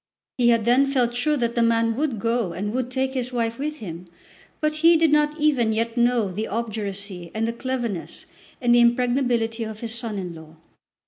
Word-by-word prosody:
He 240 -1 +4
had 230 -2 +3
then 255 +4 +4
felt 250 -3 +1
sure 295 +5 +1
that 235 -2 0
the 235 - +1
man 230 0 +2
would 275 -3 -1
go 230 -4 -1
and 205 +5 -3
would 255 -1 -2
take 265 +1 -1
his 250 -1 -3
wife 230 -1 -2
with 300 +2 -3
him, 175 - -8 0.5
but 305 0 0
he 330 +1 +6
did 320 -1 +3
not 300 +1 +2
even 265 -7 +2
yet 230 +1 -1
know 240 -4 +2
the 215 +4 -3
obduracy 200 -5 -4
and 225 +1 0
the 230 - -2
cleverness 235 -7 -4 0.3
and 240 -1 +3
the 240 - +6
impregnability 240 -1 +1
of 220 -1 -7
his 230 -1 -3
son 230 -3 -3
in 180 -3 -5
law. 160 -1 -13
235 Hz, 200 wpm, -23 LUFS, 220-260 Hz, 0.5 s, he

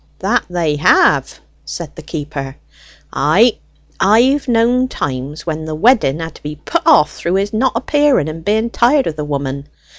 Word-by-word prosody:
"That - - 0
they 165 -4 -1
have," 150 - +3 0.2
said 165 -4 -7
the - - -9
keeper. 145 -3 -6 0.6
"Ay; - - +3 0.4
I've 245 +9 +3
knowed 245 +2 +2
times 135 - -5
when 160 -1 -4
the 155 -1 -5
wedding 200 - +2
had 160 -1 -6
to - - -16
be 150 0 -6
put 325 - -3
off 300 - +5
through 175 +2 -2
his 200 +2 -1
not 255 +4 +1
appearing, 255 - +1
being 220 +6 0
tired 265 +4 +2
of 160 - -3
the 150 - -4
woman. 140 -1 -4
170 Hz, 160 wpm, -16 LUFS, 150-235 Hz, 0.6 s, off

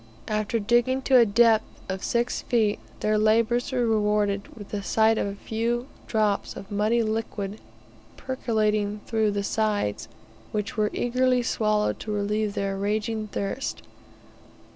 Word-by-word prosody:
After 215 +1 0
digging 240 +4 +2
to 260 -1 +5
a 235 -2 +6
depth 225 +1 +5 0.2
of 190 0 -4
six 240 +1 0
feet 220 -4 +1 0.2
their 215 0 +2
labours 230 +4 +2
were 250 -2 +1
rewarded 210 -2 +1
with 205 -2 -10
the 205 - -3
sight 220 +2 +3
of - - 0
a 200 - -4
few 230 +4 -2 0.2
drops 215 -3 0
of 195 - -10
muddy 215 +3 +2
liquid 215 -2 -3 0.6
percolating 215 -5 -1
through 220 -2 +1
the 200 0 -1
sides, 210 - -1 0.4
which 210 -1 -3
were 210 -1 +1
eagerly 250 0 +1
swallowed 215 -2 +1
to 215 - -5
relieve 210 0 -1
their 195 -1 -1
raging 215 +2 -1
thirst. 200 +6 -4
215 Hz, 140 wpm, -26 LUFS, 205-230 Hz, 0.6 s, a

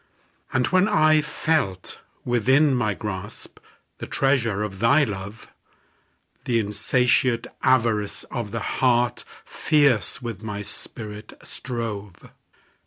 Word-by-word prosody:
And 125 -1 +2
when 185 +2 +4
I 155 -7 +4
felt 150 - -2 0.3
within 130 +5 +3
my 110 -5 0
grasp, 105 -1 -7 0.4
The - - -6
treasure 120 -7 +1
of 95 -3 -6
thy 140 +7 +4
love; 100 -2 -6 1.0
The 120 - +1
insatiate 115 +3 +1 0.2
avarice 115 -5 +1
of 120 -5 -3
the 115 +1 -4
heart 120 -2 +2 0.2
Fierce 145 -8 +2
with 115 -6 -6
my 105 -2 -5
spirit 105 +2 -9
strove. 105 -7 -6
115 Hz, 105 wpm, -24 LUFS, 105-130 Hz, 1.0 s, when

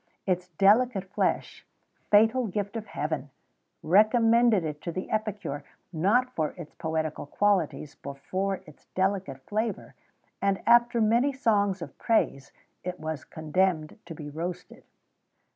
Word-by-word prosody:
Its 180 -1 0
delicate 200 +4 +3
flesh - - -1 0.5
fatal 225 +4 +4
gift 200 +2 -3
of 220 -2 -5
Heaven! 150 -5 -3 0.5
recommended 225 +2 +4
it 150 -2 -5
to 170 - -4
the 185 +3 -5
epicure; 210 -9 -2 0.3
not 230 +10 +2
for 155 -2 -2
its 165 -4 -9
poetical 160 -3 -3
qualities, 180 -5 0
but 140 0 -9
for 190 +6 -2
its 155 -2 -17
delicate 190 -8 -1
flavour; 215 0 -3 0.5
and, 195 -1 +1
after 235 0 +5
many 235 +5 +3
songs 205 -8 +1
of - - -10
praise, 140 - +1 0.3
it 180 0 -5
was 155 -3 -4
condemned 160 0 -1
to 165 - -7
be 150 -1 -8
roasted. 175 +4 -6
190 Hz, 130 wpm, -27 LUFS, 160-215 Hz, 0.5 s, after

